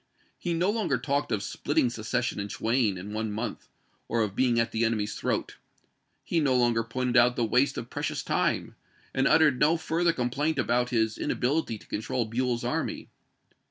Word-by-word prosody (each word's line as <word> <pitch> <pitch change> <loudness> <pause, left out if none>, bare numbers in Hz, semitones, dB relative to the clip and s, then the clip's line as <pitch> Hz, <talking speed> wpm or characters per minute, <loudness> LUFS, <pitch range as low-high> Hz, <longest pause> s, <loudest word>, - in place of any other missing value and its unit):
He 175 -2 -1
no 180 +4 +2
longer 210 - 0
talked 140 +3 -1
of 105 -3 0
splitting 120 - 0
secession 120 +1 -2
in 100 - -3
twain 110 -1 0
in 100 +4 -7
one 110 0 -2
month, 110 +3 -4 0.4
or 115 -1 +1
of 100 -2 -4
being 120 -2 +2
at 115 0 +1
the 115 - 0
enemy's 110 -2 0
throat. - - -2 0.7
He 170 - 0
no 140 -4 +2
longer 120 -2 +3
pointed 125 +2 -1
out 125 0 +5
the 120 - +1
waste 130 +5 +2
of - - -6
precious - - -3
time, - - 0 0.4
and 135 +1 +2
uttered 150 -5 +4
no 155 +3 +4
further 165 +2 +1
complaint 145 +4 -1
about 120 +1 +1
his 110 -2 0
ina - - -1
bility 125 -4 0
to - - -17
control 115 +3 -2
Buell's 120 +1 -1
army. - - -2
120 Hz, 185 wpm, -28 LUFS, 115-140 Hz, 0.7 s, out